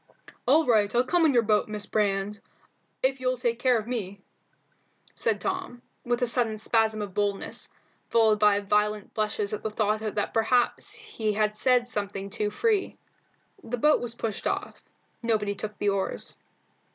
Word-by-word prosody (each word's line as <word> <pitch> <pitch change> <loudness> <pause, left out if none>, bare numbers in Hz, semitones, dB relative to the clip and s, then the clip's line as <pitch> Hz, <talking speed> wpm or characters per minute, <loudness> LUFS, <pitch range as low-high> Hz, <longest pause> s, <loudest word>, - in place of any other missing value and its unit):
"All 305 +5 +5
right, 215 -3 +3
I'll 245 - +5
come 330 +5 +3
in 285 - +2
your 235 - +5
boat, 210 -1 +2
Miss 210 -1 -4
Brand, 205 -1 0 0.6
if 265 0 +2
you'll 255 0 0
take 235 -1 -1
care 250 -2 +3
of 215 - -3
me," 205 -5 -4 0.9
said - - 0
Tom, 370 -11 -4 0.2
with 240 +1 0
a - - +5
sudden 235 -2 0
spasm 220 0 +1
of 200 -2 -7
boldness, 205 -1 -2 0.4
followed 220 -2 +4
by 205 -1 +4
violent 210 0 0
blushes 210 -1 -1
at 210 - -3
the 220 - -2
thought 215 0 0
that 215 -1 -2
perhaps 250 - 0
be 215 -1 +1
had 210 0 +1
said 245 +2 +2
something 200 -3 -4
too 210 +1 -1
free. 420 - 0 0.7
The 245 +2 -3
boat 300 +5 +4
was 240 -1 -4
pushed 225 -3 -3
off. - - -3 0.4
Nobody 215 -3 0
took 210 +1 -6
the 205 - +1
oars. 195 -1 -2
220 Hz, 165 wpm, -27 LUFS, 210-245 Hz, 0.9 s, All